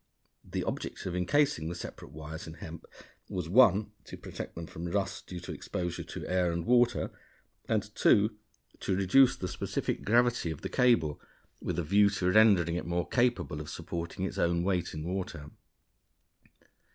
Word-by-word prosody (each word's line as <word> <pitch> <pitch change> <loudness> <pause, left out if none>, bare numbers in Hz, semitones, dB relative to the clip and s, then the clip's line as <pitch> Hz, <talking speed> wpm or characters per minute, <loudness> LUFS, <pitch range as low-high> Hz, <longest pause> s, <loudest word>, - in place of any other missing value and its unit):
The - - -3
object - - -4
of 90 - -3
incasing 90 - +1
the 85 - -5
separate - - -8
wires 80 +1 -8
in 80 - -8
hemp 80 0 -9 0.4
was 90 -3 -3
(1) 105 0 +5
to - - -9
protect - - -7
them 85 - -5
from 85 +3 -7
rust 95 +1 -2
due 90 - -6
to - - -7
exposure 90 -1 -4
to - - -7
air 90 -2 +1
and 85 0 -3
water, 120 +1 +3 0.6
and - - +2
(2) 105 +2 +4 0.4
to 95 - -1
reduce 110 +8 +5
the 90 - -4
specific - - -3
gravity 120 -4 +2
of 80 - -5
the - - -4
cable, 90 -13 +2 0.4
with - - -3
a 85 - 0
view 100 +5 +4
to 95 -2 0
rendering 100 -6 +5
it 90 - -5
more 85 0 -1
capable 120 - +1
of 75 - -8
supporting 85 +2 -4
its - - -4
own 85 0 +2
weight 90 -3 -1
in 75 - -4
water. 85 -4 -4
90 Hz, 170 wpm, -30 LUFS, 85-105 Hz, 0.6 s, 1